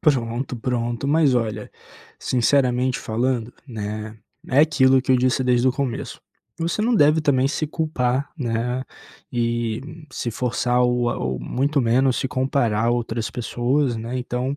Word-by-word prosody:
Pronto, 125 Hz, -3 st, 0 dB
pronto. 120 Hz, +1 st, -2 dB
Mas 145 Hz, -2 st, +3 dB
olha, 115 Hz, -3 st, -2 dB, 0.5 s
sinceramente 130 Hz, 0 st, +2 dB
falando, 120 Hz, 0 st, -1 dB
né, 110 Hz, -2 st, -5 dB, 0.3 s
é 135 Hz, +3 st, +4 dB
aquilo 135 Hz, -4 st, +4 dB
que 130 Hz, 0 st, +1 dB
eu -, -, +5 dB
disse 130 Hz, +1 st, +1 dB
desde 125 Hz, 0 st, +3 dB
o -, -, +2 dB
começo, 135 Hz, -3 st, -4 dB, 0.4 s
você 170 Hz, +5 st, -1 dB
não 240 Hz, +2 st, +2 dB
deve 155 Hz, -4 st, +5 dB
também 135 Hz, -3 st, +2 dB
se 155 Hz, +2 st, -1 dB
culpar, 140 Hz, -4 st, -1 dB
né, 125 Hz, -1 st, -2 dB, 0.5 s
e 120 Hz, -1 st, -1 dB, 0.3 s
se 120 Hz, -, -3 dB
forçar 125 Hz, +1 st, 0 dB
ou 125 Hz, -1 st, +2 dB
a -, -, -3 dB
ou 65 Hz, 0 st, -2 dB
muito 140 Hz, -, 0 dB
menos 125 Hz, +2 st, +2 dB
se -, -, -1 dB
comparar 130 Hz, -4 st, 0 dB
a -, -, +3 dB
outras 115 Hz, -2 st, -2 dB
pessoas, 125 Hz, +2 st, 0 dB
né, 115 Hz, +3 st, -4 dB
então 125 Hz, +2 st, -2 dB
125 Hz, 150 wpm, -22 LUFS, 120-135 Hz, 0.5 s, eu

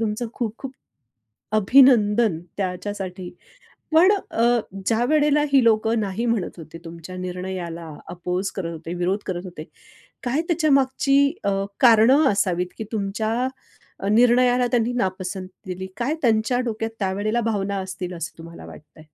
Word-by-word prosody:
तुमचं 225 Hz, +2 st, -2 dB
खूप-खूप 240 Hz, +3 st, -5 dB, 0.8 s
अभिनंदन 215 Hz, -4 st, +4 dB, 0.2 s
त्याच्यासाठी. 185 Hz, -1 st, -4 dB, 0.6 s
पण 355 Hz, +5 st, +6 dB, 0.2 s
अ, 235 Hz, +1 st, +3 dB, 0.3 s
ज्यावेळेला 295 Hz, +6 st, +2 dB
ही 265 Hz, -3 st, +6 dB
लोकं 225 Hz, 0 st, +2 dB
नाही 205 Hz, +3 st, -2 dB
म्हणत 230 Hz, -7 st, -1 dB
होते, 165 Hz, 0 st, -10 dB
तुमच्या 170 Hz, +2 st, -9 dB
निर्णयाला 180 Hz, -3 st, -5 dB, 0.2 s
अपोज 180 Hz, +2 st, -3 dB
करत 170 Hz, -4 st, -3 dB
होते, 165 Hz, +2 st, -7 dB
विरोध 180 Hz, +3 st, 0 dB
करत 175 Hz, -2 st, -3 dB
होते. 170 Hz, -4 st, -8 dB, 0.6 s
काय 260 Hz, +5 st, 0 dB
त्याच्यामागची 280 Hz, -3 st, +2 dB
अ, 200 Hz, -, +1 dB, 0.3 s
कारणं 245 Hz, +4 st, +6 dB
असावीत 180 Hz, -3 st, 0 dB
की -, -, -4 dB
तुमच्या 220 Hz, +3 st, -1 dB, 0.6 s
निर्णयाला 245 Hz, +2 st, +4 dB
त्यांनी 240 Hz, 0 st, +1 dB
नापसंत 185 Hz, -3 st, -3 dB, 0.2 s
दिली, 185 Hz, +1 st, -5 dB
काय 265 Hz, +6 st, -1 dB
त्यांच्या 230 Hz, +1 st, +2 dB
डोक्यात 225 Hz, 0 st, -3 dB
त्यावेळेला 205 Hz, +4 st, -1 dB
भावना 200 Hz, -3 st, -1 dB
असतील 185 Hz, -1 st, -5 dB
असं 165 Hz, -1 st, -7 dB
तुम्हाला 165 Hz, +1 st, -11 dB
वाटतंय? 155 Hz, +1 st, -14 dB
210 Hz, 125 wpm, -23 LUFS, 185-240 Hz, 0.8 s, पण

